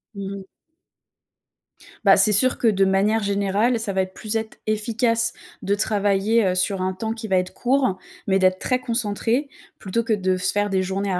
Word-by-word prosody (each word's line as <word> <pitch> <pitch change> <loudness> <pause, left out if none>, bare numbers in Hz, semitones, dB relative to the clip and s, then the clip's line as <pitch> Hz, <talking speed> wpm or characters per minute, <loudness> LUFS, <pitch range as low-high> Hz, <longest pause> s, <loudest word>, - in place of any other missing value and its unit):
Mmh 195 0 -5
mh. 195 - -10 1.6
Bah, - - +6
c'est 215 - +5
sûr 255 +6 +3
que 235 - +1
de 195 -3 +3
manière 200 +3 +1
générale, 200 +4 +1
ça 215 -3 -3
va 190 - +1
être 185 0 -5
plus 215 +2 -5
être 220 0 -3
efficace 230 +2 0 0.3
de 200 - 0
travailler, 205 +1 +1
heu, 185 -1 +1
sur 185 +1 0
un 185 0 -1
temps 220 +4 -4
qui 225 -1 -7
va 190 -2 +2
être 180 0 -2
court, 255 -5 +1 0.3
mais 195 -1 +2
d'être 185 0 +2
très 255 -1 0
concentré 235 +3 -1 0.3
plutôt 220 +4 -2
que 230 -1 0
de 190 -3 0
se 185 - 0
faire 205 0 0
des 190 -1 +1
journées 195 +1 -2
à 180 - 0
205 Hz, 200 wpm, -22 LUFS, 190-225 Hz, 1.6 s, Bah